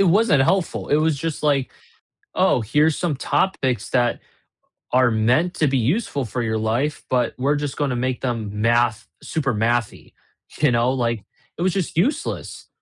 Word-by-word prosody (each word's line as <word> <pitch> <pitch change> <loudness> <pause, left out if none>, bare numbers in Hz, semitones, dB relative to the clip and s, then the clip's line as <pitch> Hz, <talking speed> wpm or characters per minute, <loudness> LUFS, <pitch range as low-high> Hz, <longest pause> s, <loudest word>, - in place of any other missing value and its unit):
it 195 - +5
wasn't 185 -7 +4
helpful, 185 +4 0
it 145 - +3
was 155 -2 +1
just, 160 0 -4
like, 140 -3 +1 0.6
"Oh, - - +3
here's 150 +8 +2
some 165 -6 -1
topics 130 - 0
that 120 -2 +1 0.7
are 125 -1 +4
meant 125 +11 +2
to 155 - +2
be 135 0 +1
useful 140 - 0
for 120 +2 -3
your 110 -1 -1
life, 120 +7 -1
but 125 -2 +1
we're 140 +3 +1
just 145 -1 -4
gonna 140 -4 0
make 125 0 -2
them 115 -5 -2
math 115 -1 +2 0.2
super 140 -6 -1
mathy," 115 +1 -1 0.5
you 150 -3 +3
know, 120 +2 +2
like, 115 -4 -1 0.3
it - - -6
was 185 0 +1
just 185 -5 -3
useless. 230 - -2
130 Hz, 170 wpm, -22 LUFS, 120-155 Hz, 0.7 s, it